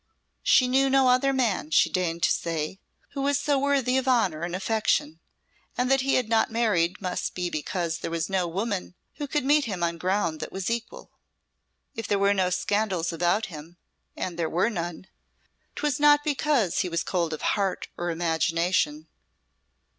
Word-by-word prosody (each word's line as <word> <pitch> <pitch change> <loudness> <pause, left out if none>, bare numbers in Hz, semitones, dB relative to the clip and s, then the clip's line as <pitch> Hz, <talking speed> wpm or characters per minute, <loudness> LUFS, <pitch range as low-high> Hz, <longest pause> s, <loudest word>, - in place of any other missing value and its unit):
She 255 - +4
knew 270 +2 +3
no 265 -1 +4
other 255 +2 +3
man, 230 - 0
she 160 - +4
deigned 170 -2 -2
to - - +4
say, 165 +2 -2 0.3
who 280 - -5
was 285 +1 +1
so 285 -1 +1
worthy 265 -2 +2
of 260 - -5
honour 210 -11 +2
and 170 +1 -3
affection, 225 +10 0 0.6
and 250 +1 +1
that 270 0 +4
he 270 +1 +1
had 250 -3 +1
not 225 0 +2
married 200 -7 +1
must 180 -2 -3
be 180 -1 -2
because 165 +2 -2
there - - -4
was 165 0 -2
no 190 -2 0
woman 190 +1 -3 0.2
who 290 - -4
could 280 -1 -1
meet 290 +1 +4
him 190 -6 -3
on 170 0 -1
ground 180 -3 0
that - - -6
was 195 +3 -3
equal. 235 0 -5 0.8
If 225 - -5
there 205 - +1
were 200 0 +3
no 190 -2 +1
scandals 185 -2 -1
about 175 +6 +1
him 165 -2 -11 0.4
and 175 -2 -4
there 160 -2 0
were 180 +7 +1
none 175 -2 -5 0.7
'twas 295 -1 -1
not 295 0 +5
because 285 - +1
he 185 - 0
was 170 0 -1
cold 170 -3 -1
of 155 - -5
heart 195 -2 -1
or 175 0 -3
imagination. 165 -1 0
195 Hz, 180 wpm, -26 LUFS, 170-255 Hz, 0.8 s, not